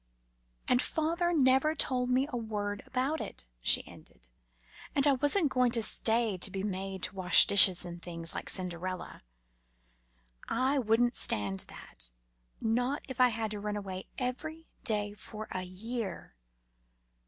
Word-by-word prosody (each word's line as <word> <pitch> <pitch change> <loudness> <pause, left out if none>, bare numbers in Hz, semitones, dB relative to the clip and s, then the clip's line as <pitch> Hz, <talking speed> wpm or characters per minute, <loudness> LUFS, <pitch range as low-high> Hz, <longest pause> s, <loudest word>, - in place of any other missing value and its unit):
"And 250 - +3
father 335 +2 -1
never 275 0 +2
told 250 -4 0
me 255 +2 +2
a 265 - -7
word 205 -3 -4
about 270 +5 -2
it," - - -5 0.2
she - - +4
ended; - - -14 0.7
"and 275 - +4
I 290 - +5
wasn't 290 +4 +1
going 250 -1 +2
to 230 -2 +3
stay 225 -3 +3
to 185 - +3
be 190 0 -5
made 195 -1 -5
to - - -1
wash 180 -2 +7
the - - -11
dishes 190 -3 +7
and 175 0 -9
things, 165 -2 -4
like - - -2
Cinderella. 180 0 -2 1.3
I 270 +2 +1
wouldn't 240 +1 +1
stand 100 -2 +2
that, - - -8 0.5
not 245 +5 -1
if 260 -2 -3
I 250 - +7
had 220 -2 -4
to 210 - -5
run 210 0 -4
away 190 -2 -6
every 310 +6 -5 0.2
day 210 -2 0
for 215 +1 -9
a 185 - -3
year. 195 - -6
220 Hz, 155 wpm, -30 LUFS, 190-255 Hz, 1.3 s, wash